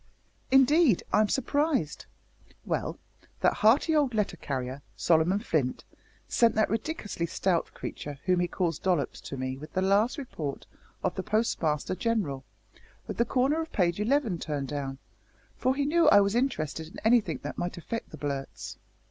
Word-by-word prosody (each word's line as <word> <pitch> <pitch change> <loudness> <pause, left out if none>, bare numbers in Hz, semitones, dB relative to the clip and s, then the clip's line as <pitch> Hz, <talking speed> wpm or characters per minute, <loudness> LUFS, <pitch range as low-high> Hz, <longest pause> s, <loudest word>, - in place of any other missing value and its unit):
"Indeed! 270 - +5
I'm 215 0 +4
surprised. 275 - 0 0.6
Well, - - -2 0.4
that - - +4
hearty 265 +9 +4
old 280 -6 +2
letter 210 -4 0
carrier, 130 -3 -4
Solomon 170 +3 +3
Flint, 155 - -1 0.4
sent 230 -2 +3
that 215 - +2
ridiculously 220 - -2
stout 175 0 0
creature 145 -1 -6
whom 180 -1 +3
he 175 - +1
calls 170 -3 -1
Dollops 175 -7 0
to 135 - -7
me 130 0 -3
with 150 +2 -11
the 185 - +1
last 205 +8 +3
Report 160 - -5 0.4
of - - +1
the - - -3
Postmaster 185 -8 0
General, 185 -9 -1 0.6
with - - -6
the 235 - +3
corner 270 +7 +1
of 320 - -6
page 175 -2 +1
eleven 225 - +1
turned 145 -4 -3
down, 140 -2 -4 0.6
for 255 +1 +1
he 285 0 0
knew 330 +3 +4
I 205 - +8
was 200 0 +1
interested 160 - -1
in 165 - -12
anything 220 - +3
that 145 - -5
might 175 0 -3
affect 230 +7 -5
the 155 - -10
Blurts. 140 -2 -5
190 Hz, 160 wpm, -28 LUFS, 155-240 Hz, 0.6 s, I